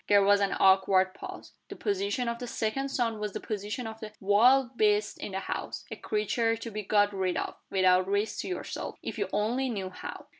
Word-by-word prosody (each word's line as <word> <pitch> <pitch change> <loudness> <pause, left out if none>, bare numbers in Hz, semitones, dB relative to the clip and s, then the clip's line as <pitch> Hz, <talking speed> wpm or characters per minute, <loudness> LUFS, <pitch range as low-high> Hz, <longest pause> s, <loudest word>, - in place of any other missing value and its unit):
There 205 -1 +5
was 205 +1 +5
an 200 - +1
awkward 190 -1 +4
pause. - - -9 0.2
The - - -7
position 395 - -1
of 235 0 -2
the 245 - -5
second 240 +5 -2
son 230 -5 -1
was 210 -2 -3
the - - -3
position 210 +3 -4
of 220 +1 -7
a 215 -1 -7
wild 240 +6 +4
beast 210 -1 +2
in 195 - -6
the 190 - -2
house - - -5
a - - -3
creature 225 +2 0
to 230 0 -7
be 215 0 -3
got 205 0 +2
rid 185 -2 -1
of, - - -2 0.2
without 185 -1 +3
risk 205 +2 0
to - - -3
yourself, 365 - -5
if - - -5
you 200 -2 -1
only 240 +6 0
knew 195 -5 -3
how. - - -8
210 Hz, 215 wpm, -29 LUFS, 195-235 Hz, 0.2 s, There